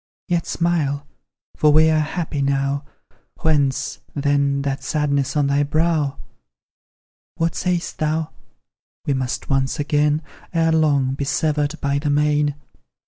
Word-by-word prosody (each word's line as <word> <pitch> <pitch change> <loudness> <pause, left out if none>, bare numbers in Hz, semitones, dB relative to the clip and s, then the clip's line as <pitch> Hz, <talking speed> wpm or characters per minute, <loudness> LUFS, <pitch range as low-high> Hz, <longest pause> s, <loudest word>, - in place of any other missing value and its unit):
Yet 175 -3 0
smile 150 -4 0 0.5
for 150 - +4
we 155 +2 +6
are 155 - +3
happy 155 -1 -2
now. 140 +1 0 0.6
Whence, 145 -5 +1 0.2
then, 140 -1 +1
that 140 -1 -2
sadness 140 -2 0
on 145 - +3
thy 140 +1 +2
brow? 150 -1 +1 1.2
What 165 0 0
sayst 180 -2 -2
thou?" 155 0 0 0.7
We 140 - +1
muse 130 -2 -2
once 135 0 0
again, 150 +1 +1 0.3
Ere 165 0 +3
long, 145 -5 +2
be 140 - -3
severed 150 +1 0
by 140 0 +1
the 145 0 -2
main!" 150 0 +2
145 Hz, 130 wpm, -21 LUFS, 140-155 Hz, 1.2 s, we